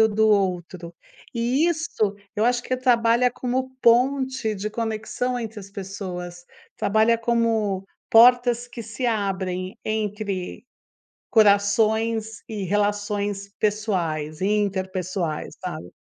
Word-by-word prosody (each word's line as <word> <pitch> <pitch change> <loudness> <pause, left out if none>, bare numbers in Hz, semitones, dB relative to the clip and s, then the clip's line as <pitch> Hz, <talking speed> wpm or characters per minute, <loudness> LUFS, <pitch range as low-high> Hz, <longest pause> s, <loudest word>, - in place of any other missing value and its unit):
o 220 - +6
do 220 +1 +2
outro. 180 -4 0 0.4
E 245 +7 +2
isso, 310 -11 -1 0.2
eu 210 - +2
acho 245 0 +2
que 255 - -2
trabalha 245 -1 +3
como 255 +2 -2
ponte 260 -1 +2
de 210 +2 -3
conexão 230 +3 -2
entre 225 -2 -6
as 195 0 -12
pessoas, 185 -3 -7 0.3
trabalha 220 +3 +3
como 225 -4 0 0.3
portas 245 +1 +6
que 240 -1 -8
se 225 +3 -4
abrem 190 -4 -2
entre 210 -3 -3 0.7
corações 220 +1 +3
e 210 -3 -4
relações 205 0 -1
pessoais 175 -8 -1
e 190 - +1
interpessoais, 190 -5 -2
sabe. 175 - -6
215 Hz, 110 wpm, -24 LUFS, 195-230 Hz, 0.7 s, o